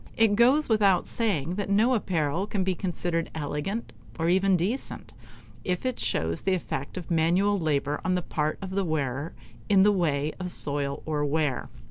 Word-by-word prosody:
It 225 -2 +4
goes 260 +7 +4
without 205 -5 +3
saying 180 - -1
that 205 -1 -2
no 220 +6 +4
apparel 175 - 0
can 200 -3 -1
be 185 0 +1
considered 175 -2 -2
elegant, 155 +9 -3 0.2
or 165 0 +1
even 190 +1 +3
decent, 210 +11 -3 0.5
if 180 +5 -2
it 255 -1 -1
shows 80 0 -1
the 190 - +1
effect 145 -3 -5
of 180 -1 -6
manual 180 +5 +2
labor 150 -2 0
on 185 - +1
the 180 - -1
part 155 -1 -1
of 190 - -5
the 195 +1 0
wearer, 145 -2 -2 0.3
in 195 -2 +6
the 210 - +5
way 155 -6 0
of 180 -1 -3
soil 140 -4 -2
or 150 -2 -1
wear. 145 -2 0
180 Hz, 175 wpm, -27 LUFS, 150-200 Hz, 0.5 s, in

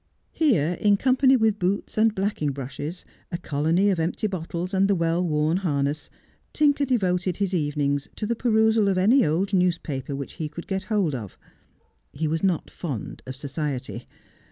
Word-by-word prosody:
Here, 180 - +2
in 205 -1 +4
company 260 +2 +4
with 220 -2 +2
boots 185 +3 -1
and 220 0 +3
blacking 190 -7 -1
brushes, 145 +6 -6 0.3
a 175 - -2
colony 170 +5 +1
of 180 - -1
empty 165 +6 -1
bottles, 180 -1 -3
and 195 +1 +3
the 200 - +3
well 170 0 +1
worn 155 0 +1
harness, 145 -5 -1 0.4
Tinker 290 -1 +3
devoted 185 -8 0
his 195 -2 -1
evenings 145 -3 0
to 215 - -3
the 235 +2 0
perusal 220 -2 +3
of 195 -2 +1
any 225 +9 +5
old 175 +6 0
newspaper 165 -7 0
which 140 -1 -6
he 155 - -2
could 170 +3 -8
get 190 0 -3
hold 195 -7 +1
of. 110 -7 -6 0.8
He 155 +3 -2
was 160 +1 -1
not 185 -4 0
fond 140 - -5
of 130 - -5
society. 140 -1 -4
180 Hz, 170 wpm, -25 LUFS, 150-205 Hz, 0.8 s, any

